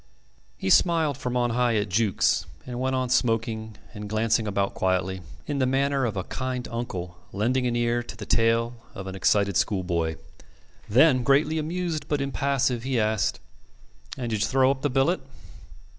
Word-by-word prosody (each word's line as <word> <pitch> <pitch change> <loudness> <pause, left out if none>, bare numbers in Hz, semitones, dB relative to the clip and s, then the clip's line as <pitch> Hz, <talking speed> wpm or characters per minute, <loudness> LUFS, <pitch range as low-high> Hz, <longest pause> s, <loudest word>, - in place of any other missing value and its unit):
He 95 - -1
smiled 165 -5 +4
from 125 -1 -3
on 120 -1 +1
high 120 -1 +2
at 105 -1 +1
Jukes, 100 +1 +1 0.2
and 125 -1 -5
went 130 +1 0
on 130 0 0
smoking 115 -3 0 0.2
and 105 -2 -7
glancing 110 +1 +1
about 100 -1 0
quietly, 95 0 0 0.2
in 145 -2 -2
the 130 - +2
manner 135 0 +1
of 110 -4 -2
a 95 - -1
kind 130 +3 -4
uncle 90 -7 -5
lending 125 +6 0
an 120 - -1
ear 120 0 +1
to 120 -2 -9
the 105 - -7
tale 115 +2 +2 0.2
of 95 -2 -6
an 95 - -6
excited 100 0 +2
schoolboy. 85 -5 0 0.7
Then, 130 +4 +5
greatly 140 +5 +3
amused 165 0 -3
but 145 - 0
impassive, 140 -3 0
he 130 -1 0
asked: 110 -1 0 0.8
"And 120 -2 -3
did 110 -2 -1
you 110 - +2
throw 135 +1 +3
up 135 -1 -4
the 145 - +1
billet?" 135 +6 +2
120 Hz, 175 wpm, -26 LUFS, 105-135 Hz, 0.8 s, Then